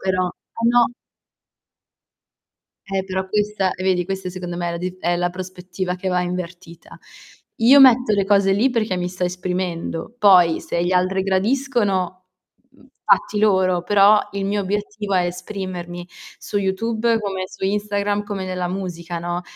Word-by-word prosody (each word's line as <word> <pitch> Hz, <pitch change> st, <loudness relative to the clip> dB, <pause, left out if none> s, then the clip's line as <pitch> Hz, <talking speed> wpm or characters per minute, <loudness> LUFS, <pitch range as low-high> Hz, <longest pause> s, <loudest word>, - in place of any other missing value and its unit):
però, 185 Hz, -1 st, 0 dB
eh 230 Hz, +5 st, -6 dB
no. 240 Hz, 0 st, +4 dB, 2.0 s
Eh 195 Hz, -1 st, -2 dB
però 190 Hz, 0 st, -3 dB
questa 210 Hz, -2 st, 0 dB
e 185 Hz, -, -7 dB
vedi 185 Hz, -2 st, +1 dB
questa 190 Hz, 0 st, -4 dB
secondo 175 Hz, -1 st, -6 dB
me 175 Hz, 0 st, -2 dB
è -, -, -2 dB
la -, -, -3 dB
dif 180 Hz, +1 st, -5 dB
è 175 Hz, -1 st, 0 dB
la 175 Hz, 0 st, 0 dB
prospettiva 185 Hz, 0 st, -5 dB
che 190 Hz, +1 st, -3 dB
va 180 Hz, -1 st, +1 dB
invertita. 180 Hz, -1 st, -7 dB, 0.6 s
Io 255 Hz, +5 st, +7 dB
metto 250 Hz, -3 st, +6 dB
le 200 Hz, -1 st, +1 dB
cose 195 Hz, -1 st, +3 dB
lì 225 Hz, +7 st, +2 dB
perché 220 Hz, -6 st, -1 dB
mi 180 Hz, 0 st, -2 dB
sto 180 Hz, 0 st, -3 dB
esprimendo, 180 Hz, +1 st, -3 dB
poi 180 Hz, -6 st, +5 dB
se 170 Hz, -, -2 dB
gli 175 Hz, -, 0 dB
altri 185 Hz, +1 st, +1 dB
gradiscono, 195 Hz, -3 st, 0 dB, 0.4 s
mhmm, -, -, -22 dB, 0.2 s
fatti 210 Hz, -, +2 dB
loro, 190 Hz, -4 st, +3 dB
però 205 Hz, +2 st, +5 dB
il 200 Hz, 0 st, -3 dB
mio 205 Hz, +1 st, 0 dB
obiettivo 205 Hz, +1 st, -3 dB
è 180 Hz, -1 st, +2 dB
esprimermi 180 Hz, -1 st, -6 dB, 0.3 s
su -, -, -5 dB
YouTube, 225 Hz, +4 st, 0 dB
come 195 Hz, -3 st, -3 dB
su -, -, -7 dB
Instagram, 205 Hz, +1 st, -1 dB
come 205 Hz, -2 st, -5 dB
nella 180 Hz, -1 st, -3 dB
musica, 175 Hz, -2 st, -5 dB
no, 175 Hz, +1 st, -3 dB
190 Hz, 160 wpm, -21 LUFS, 180-205 Hz, 2.0 s, Io